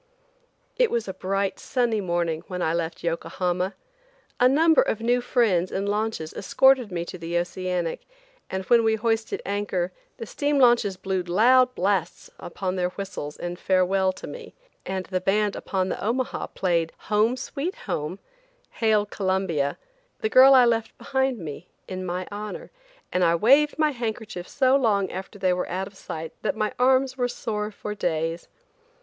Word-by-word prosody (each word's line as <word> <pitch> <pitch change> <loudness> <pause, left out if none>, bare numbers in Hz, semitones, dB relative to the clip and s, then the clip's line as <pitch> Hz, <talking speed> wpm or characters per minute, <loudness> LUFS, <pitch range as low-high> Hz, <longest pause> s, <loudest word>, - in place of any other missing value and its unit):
IT - - +4
was 230 -3 -1
a 190 - -4
bright 195 +1 -2
sunny 240 -5 0
morning 170 -3 -1
when 180 -1 -5
I 160 -2 0
left 170 -1 -3
Yokohama. 175 +2 -1 0.6
A 250 0 +6
number 320 +4 +5
of 220 - -1
new 240 +2 +2
friends 210 -8 +1
in 195 +1 -2
launches 205 -5 -2
escorted 260 +2 +3
me 170 -1 -3
to 180 - -8
the 170 +1 -2
Oceanic, 180 -1 -2 0.4
and 190 0 -3
when 235 +3 +5
we 220 0 +3
hoisted 225 0 -1
anchor 195 -3 -1 0.3
the 230 - -6
steam 290 +5 -1
launches 240 -7 +4
blew 190 -1 -1
loud 250 +8 +4
blasts 185 -2 -1
upon 185 +1 -4
their 180 0 +1
whistles 180 -6 -6
in 175 0 -5
farewell 190 +1 +2
to - - -10
me, 475 -2 -9 0.3
and 190 -1 -3
the 185 -1 -2
band 205 +2 +1
upon 190 -1 -2
the - - -4
Omaha 245 +4 -1
played 170 -3 0 0.2
"Home, 220 +4 +3
Sweet 285 +7 -4
Home," 155 +5 -3 0.5
"Hail 215 -2 +2
Columbia," 190 -7 0
and - - -13
"The 435 - 0
Girl 265 -2 +8
I 255 -1 +7
Left 225 -1 0
Behind 265 -2 0
Me," 165 -1 -8 0.2
in 185 -1 -5
my 180 +1 -3
honor; 210 +1 -6 0.4
and 180 - +2
I 170 -1 +4
waved 275 - +4
my 310 -1 +3
handkerchief 220 -7 -5
so 265 -1 +3
long 205 -8 +2
after 190 +2 -7
they 185 -2 +2
were 180 - -2
out 190 +1 -2
of 195 - -12
sight 160 -4 -7
that 215 - -1
my 215 0 -1
arms 260 +1 +3
were 245 -1 +1
sore 210 -3 -3
for 210 0 -6
days. 165 -3 -2
200 Hz, 170 wpm, -25 LUFS, 180-240 Hz, 0.6 s, Girl